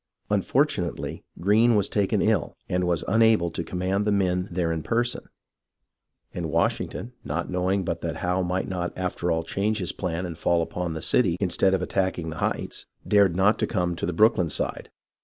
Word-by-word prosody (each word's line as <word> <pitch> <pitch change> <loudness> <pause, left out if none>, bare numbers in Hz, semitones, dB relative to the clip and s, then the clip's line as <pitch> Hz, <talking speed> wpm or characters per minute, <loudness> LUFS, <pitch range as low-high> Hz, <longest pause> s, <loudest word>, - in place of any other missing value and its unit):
Unfortunately, 105 - 0 0.2
Greene 110 +5 +4
was 100 -1 +2
taken 100 0 +1
ill, 105 -7 +1
and 90 0 0
was 85 -3 +1
unable 110 -5 +4
to 85 - -3
command 95 +4 -1
the 105 - +1
men 90 -2 +1
there 85 -1 0
in 80 -1 -2
person, 120 +6 -1 1.0
and 85 -2 -3
Wash - - +2
ington, 120 - -6
not 85 +5 -3
knowing 90 +1 0
but - - -2
that - - -3
Howe 90 +1 0
might 90 +1 -1
not 90 -2 -3
after 90 -1 -2
all 80 -1 +1
change 100 +6 -1
his 90 -4 -2
plan 90 -1 -3
and 85 -2 -5
fall 85 +1 +2
upon 85 0 -4
the 80 - -5
city 90 -9 +2
instead 95 0 +2
of 90 - -2
attacking 95 -4 -1
the 80 - -7
Heights, - - -2 0.2
dared 100 -4 +4
not 100 +4 +3
come 90 -1 0
to 85 - -3
the - - 0
Brooklyn 90 -3 +4
side. - - -2
90 Hz, 185 wpm, -25 LUFS, 85-100 Hz, 1.0 s, Greene